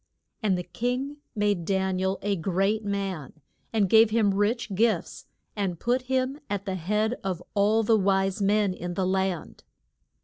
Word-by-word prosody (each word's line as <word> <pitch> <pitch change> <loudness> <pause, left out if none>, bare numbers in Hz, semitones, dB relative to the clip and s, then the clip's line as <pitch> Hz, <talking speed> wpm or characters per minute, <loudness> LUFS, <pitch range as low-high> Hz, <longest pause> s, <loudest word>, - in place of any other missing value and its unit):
And 200 -4 +2
the 180 - -3
king 250 +10 -3 0.2
made 205 -4 +1
Dan 190 +1 0
i - - -2
el 190 +1 0
a 200 0 +1
great 195 +5 0
man, 195 -8 -3 0.4
and 215 -3 +2
gave 220 +3 +6
him 215 -3 +2
rich 205 +2 0
gifts, 220 +3 0 0.3
and 190 -5 -2
put 245 +2 +1
him 260 +2 0
at 200 -1 -3
the 190 - -2
head 210 +6 0
of 185 -2 -3
all 210 +2 +3
the 225 +1 +4
wise 195 +1 +1
men 200 -1 +2
in 175 -1 -5
the 190 - 0
land. 190 -2 -2
200 Hz, 170 wpm, -26 LUFS, 190-220 Hz, 0.4 s, gave